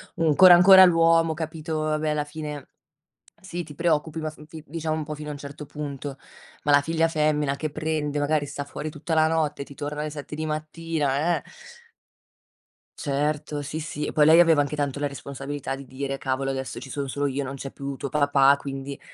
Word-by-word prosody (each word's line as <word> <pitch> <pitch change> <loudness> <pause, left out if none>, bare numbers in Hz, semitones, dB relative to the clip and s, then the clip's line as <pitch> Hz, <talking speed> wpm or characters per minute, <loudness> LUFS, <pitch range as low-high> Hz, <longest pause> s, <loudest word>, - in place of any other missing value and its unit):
ancora 165 +3 +7
ancora 190 +2 +9
l'uomo, 165 -2 +4
capito 160 0 -4
vabbè, 155 0 0
alla 150 -1 0
fine, 150 -2 -7 0.7
sì, 175 -2 -5
ti 150 - -11
preoccupi, 160 -1 0
ma 155 0 -3
f 150 - -15
vi 160 -1 -10
diciamo 160 0 -3
un 155 - -3
po' 150 0 -5
fino 150 0 -8
a - - -3
un 145 - -7
certo 145 +1 -8
punto, 140 -2 -6 0.5
ma 145 - +3
la 145 - +7
figlia 165 +2 +1
femmina 150 -3 +1
che 155 +1 -4
prende 150 -1 -2
magari 145 0 +1
sta 145 0 -5
fuori 150 +2 -6
tutta 160 +2 -3
la 155 0 +4
notte, 155 -3 0
ti 140 - -11
torna 150 0 -4
alle 150 0 -3
7 145 0 -8
di 155 +1 -3
mattina, 155 0 -1
eh - - -13 1.6
Certo, 150 +1 -1
sì, 150 +3 -5
sì. 150 -1 -4
E - - -3
poi 150 -1 +4
lei 160 +2 +7
aveva 165 -3 +6
anche 145 +1 -2
tanto 145 -1 -2
la 145 - -1
responsabilità 140 0 -5
di 135 0 -10
dire: 135 +1 -4
"Cavolo 135 0 -2
adesso 135 -1 -4
ci 135 - -10
son 140 0 -3
solo 145 +2 -1
io, 140 +1 -2
non 135 +1 -5
c'è 135 0 -6
più 140 0 -6
tuo 140 - -5
papà, 140 -1 +4
quindi" 135 0 -6
150 Hz, 205 wpm, -25 LUFS, 140-155 Hz, 1.6 s, ancora